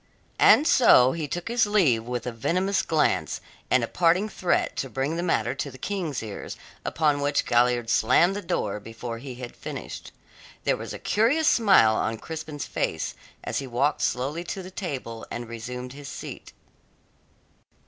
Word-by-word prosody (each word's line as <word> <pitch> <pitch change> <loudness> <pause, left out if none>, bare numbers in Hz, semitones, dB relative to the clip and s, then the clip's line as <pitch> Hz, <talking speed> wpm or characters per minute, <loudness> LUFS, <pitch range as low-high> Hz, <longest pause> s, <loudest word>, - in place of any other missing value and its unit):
And 300 - +7
so 130 - +6
he 160 -1 -3
took 175 +5 -4
his 235 -2 +2
leave 150 - +3
with 120 -1 -4
a 125 - -2
venomous 185 - 0
glance, 160 -2 +1 0.3
and 130 -2 +3
a - - -1
parting 180 - +2
threat 180 -4 0
to 135 - -2
bring 135 +6 -2
the 170 - -2
matter 120 -9 0
to 140 +1 -4
the 130 - -12
King's 170 - -3
ears, 105 -2 -7 0.3
upon 150 -3 +1
which 145 0 +1
Galliard 120 -1 +2
slammed 165 - +3
the 205 - -3
door 105 - -2
before 115 +2 -7
he 130 0 -8
had 120 -1 -8
finished. - - -7 0.5
There - - +2
was - - -7
a - - -5
curious 265 +9 +2
smile 190 - +5
on 110 +1 -1
Crispin's 155 +2 -6
face 80 - -2 0.3
as - - -2
he 135 - -5
walked 130 +5 0
slowly 140 +7 -1
to 190 +2 -5
the 185 - -9
table, 135 - -5
and 120 0 -5
resumed 125 +2 -6
his 145 0 -10
seat. - - -8
140 Hz, 170 wpm, -26 LUFS, 120-175 Hz, 0.5 s, And